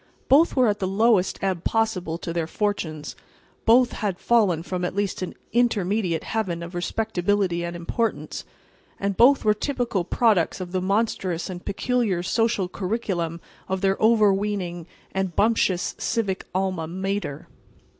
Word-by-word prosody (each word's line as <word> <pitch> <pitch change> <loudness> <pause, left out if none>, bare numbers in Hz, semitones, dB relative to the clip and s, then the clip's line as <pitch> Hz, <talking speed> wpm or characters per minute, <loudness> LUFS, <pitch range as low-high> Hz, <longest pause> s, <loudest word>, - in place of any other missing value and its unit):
Both 300 +5 +5
were 255 -3 +4
at 210 -1 0
the 190 - -1
lowest 200 -1 +2
ebb 185 -3 -1
possible 185 -7 0
to 170 -1 -5
their 165 -2 -1
fortunes; 165 -6 -3 0.5
both 240 +2 +5
had 200 -5 -2
fallen 200 -9 +2
from 180 0 -3
at 180 - -2
least 200 -2 -1
an 185 - -4 0.2
intermediate 205 -7 +1
Heaven 185 -7 -2
of 170 +2 -8
respectability 185 -1 0
and 170 0 -4
importance, 195 +7 -2 0.6
and 200 0 -1
both 265 +4 +5
were 210 - +5
typical 240 -4 -1
products 200 -2 +2
of 180 -1 -6
the 185 0 -1
monstrous 190 -3 -1
and 180 -1 -8
peculiar 215 -5 0
social 220 0 +1
curriculum 180 -4 -3 0.3
of 190 0 -1
their 195 -1 +2
overweening 200 -5 +2 0.2
and 190 -2 -2
bumptious 205 -4 +2
civic 200 -5 -1
alma 185 -3 -1
mater. 190 -4 -3
195 Hz, 145 wpm, -24 LUFS, 175-220 Hz, 0.6 s, Both